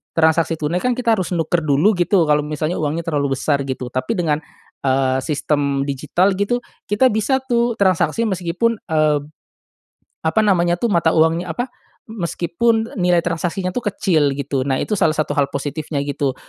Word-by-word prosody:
transaksi 165 0 +3
tunai 160 +4 -1
kan 250 - +2
kita 235 -3 +2
harus 185 -3 -3
nukar 165 +1 +1
dulu 150 +7 +3
gitu 175 0 +3
kalau 150 0 +3
misalnya 155 +3 -2
uangnya 155 +2 -1
terlalu 140 -3 0
besar 140 -2 +1
gitu 130 -2 -4
tapi 130 - -2
dengan, 155 -2 0 0.4
eee, 130 -1 +1
sistem 145 -2 0
digital 165 +8 +1
gitu 205 +5 0 0.3
kita 235 +6 +4
bisa 220 +4 +1
tuh 240 -2 0
transaksi 200 +4 +2
meskipun, 190 +4 0 0.2
eee, 155 -2 +3 1.1
apa 160 +7 +3
namanya 175 -4 +3
tuh, 230 +5 -1
mata 170 -2 +3
uangnya 160 +2 +2
apa, 245 +1 -3 0.4
m 220 -2 -9
meskipun 225 +8 0
nilai 175 -1 +3
transaksinya 180 +2 -2
tuh 250 - -2
kecil 160 -8 +1
gitu. 140 -2 -2
Nah 135 - +1
itu - - -4
salah 155 -3 +2
satu 155 - -1
hal 140 -1 +1
positifnya 145 +1 -3
gitu. 140 -2 -2
165 Hz, 165 wpm, -19 LUFS, 145-195 Hz, 1.1 s, kita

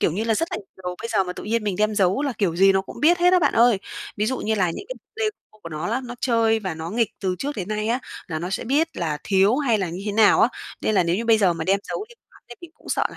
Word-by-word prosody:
kiểu 155 - +2
như 210 +5 -2
là, 225 -1 +2
rất 330 +6 -1
là - - -1
nhiều 195 - -10 0.2
đồ. 180 0 -4
Bây 230 - -5
giờ 195 - +2
mà 180 - -4
tự - - -9
nhiên 225 0 -1
mình 200 -3 -1
đem 215 0 +2
giấu 195 +5 +2
là 280 -2 -1
kiểu 175 -5 0
gì 195 +1 +6
nó 190 - +2
cũng - - -11
biết 345 +4 +5
hết 355 +1 +4
á 365 - +6
bạn 300 -5 +2
ơi. 235 -3 +5 0.4
Ví 210 - 0
dụ 260 +3 -1
như 220 - -1
là 190 -4 +2
thích - - -8
những - - -7
c 445 - -24
Lego 435 -1 +2 0.3
của - - -7
nó 155 +1 -4
á, 240 - 0
nó 240 0 -7
chơi 230 -2 +2
và 190 -5 -4
nó 160 +2 -6
nghịch 225 -1 +1
từ 185 -2 -1
trước 285 -2 -4
đến 190 -1 -4
nay 215 0 -2
á, 240 +2 +1 0.3
là 160 -2 -3
nó 175 +3 -4
sẽ 195 - -3
biết 290 +7 +2
là 155 -4 -2
thiếu 200 +5 +3
hay 245 -8 +2
là 190 - -1
như 175 +3 -6
thế 205 - -1
nào 215 -1 +5
á. - - +5 0.3
Nên 215 - 0
là 195 - +4
nếu 170 +1 0
như 230 - -2
bây 225 -1 +4
giờ 190 -4 +4
mà 165 - -4
đem 195 +1 +2
giấu 415 - -3
đi 475 - -16
của 475 - -55
hắn - - -20
thì 240 - -9
mình 345 - -11
cũng - - -17
sợ - - +1
là - - -12
215 Hz, 340 wpm, -23 LUFS, 185-240 Hz, 0.4 s, gì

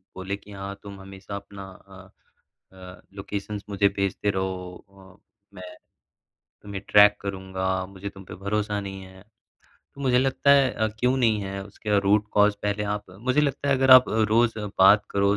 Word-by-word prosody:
बोले 95 +1 -4
कि 105 - -17
हाँ, 100 0 -7
तुम 100 -1 -10
हमेशा 95 +1 -10
अपना 100 0 -9 0.2
अ 95 0 -15 0.7
अ, 90 0 -12
लोकेशन्स 100 +1 -6
मुझे 100 0 +2
भेजते 100 +1 -1
रहो 95 -2 -3 0.4
अ, - - -37 0.3
मैं 90 -1 -10 0.9
तुम्हें 100 -1 -7
ट्रैक 105 0 +6
करूँगा, 95 -1 -3
मुझे 100 +1 -8
तुम 95 -1 -13
पे - - -10
भरोसा 105 +2 -2
नहीं 95 -1 -7
है। 95 0 -14 0.7
तो 140 - -13
मुझे 130 -2 +2
लगता 135 +2 +1
है 140 -2 +5
अ, 110 - -1
क्यों 125 +2 +1
नहीं 115 -5 +2
है 95 0 -5
उसका 105 +1 -3
रूट 105 +2 +2
कॉज़ 105 0 +4
पहले 105 0 -1
आप 105 0 -6 0.2
मुझे 130 +5 +1
लगता 140 -1 -1
है, 140 - +4
अगर 130 0 +2
आप 130 0 +9
रोज़ 110 +1 +1 0.2
बात 100 +2 +6
करो, 100 +1 +1
100 Hz, 170 wpm, -24 LUFS, 95-105 Hz, 0.9 s, आप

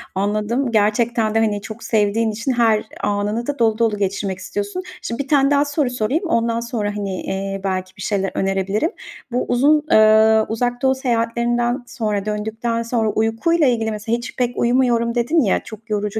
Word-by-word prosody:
anladım. 215 +6 0
Gerçekten 220 +1 +1
de, - - +4
hani, 210 -2 0
çok 220 +2 -9
sevdiğin 220 +1 +1
için 230 +5 -2
her 230 -3 +2 0.2
anını 205 +3 -1
da 290 0 -3
dolu 220 -2 +2
dolu 225 -2 +1
geçirmek 195 -1 -2
istiyorsun. 405 - -4 0.2
Şimdi 235 +5 -3
bir - - -18
tane 275 -1 +3
daha 285 0 +3
soru 285 -2 0
sorayım. 245 - -1
Ondan 230 -6 +1
sonra, 235 -3 -3
hani, 195 -3 -3
eee, 195 0 -4
belki 185 -1 -3
bir - - -9
şeyler 195 -1 -1
önerebilirim. 195 - 0 0.4
Bu 250 - 0
uzun, 295 +5 +3
eee, 220 0 +6
Uzak 245 +2 -1
Doğu 265 0 +3
seyahatlerinden 240 0 0
sonra 210 -5 -2
döndükten 220 +2 -2
sonra 230 -2 0
uykuyla 225 +10 +1
ilgili 225 -2 +1
mesela 220 +2 -2
hiç 240 - -8
pek 245 -2 -1
uyumuyorum 235 -1 +2
dedin 290 +8 +2
ya, 205 -8 +2
çok 220 0 -12
yorucu 210 0 -1
225 Hz, 175 wpm, -20 LUFS, 210-245 Hz, 0.4 s, eee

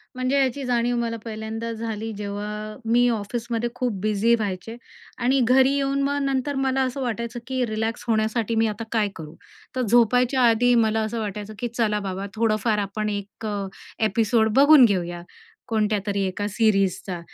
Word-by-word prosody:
म्हणजे 255 +2 0
याची 270 +1 0
जाणीव 240 0 +1
मला 230 -1 -2
पहिल्यांदा 220 +1 -5
झाली 225 -1 -4
जेव्हा 210 +1 -5 0.2
मी 245 +1 +4
ऑफिसमध्ये 235 +2 -2
खूप 245 -5 -2
बिझी 215 +2 +2
व्हायचे 210 0 -4 0.4
आणि 255 +3 +2
घरी 260 +3 +4
येऊन 275 0 0
मग 285 +1 0
नंतर 275 +1 -1
मला 270 0 +1
असं 260 +1 -3
वाटायचं 235 -1 -3
की 260 -1 0
रिलॅक्स 220 +1 -3
होण्यासाठी 220 0 0
मी 225 0 +3
आता 215 +1 -4
काय 215 -3 +1
करू, 155 0 -9 0.4
तर 255 - 0
झोपायच्या 245 +3 +3
आधी 245 +2 +3
मला 220 0 +1
असं 220 +2 -3
वाटायचं 210 0 -5
की 245 - -1
चला 225 -3 0
बाबा 195 -1 -4
थोडंफार 215 -1 +1
आपण 205 +1 -2
1 205 +1 -6
अ, 200 -2 -3 0.4
एपिसोड 220 +1 +2
बघून 285 -1 +8
घेऊया 175 -5 -1 0.5
कोणत्यातरी 210 -2 0
एका 205 +2 -3
सीरीज 195 -3 +2
चा, 180 -3 -4
225 Hz, 165 wpm, -24 LUFS, 210-245 Hz, 0.5 s, बघून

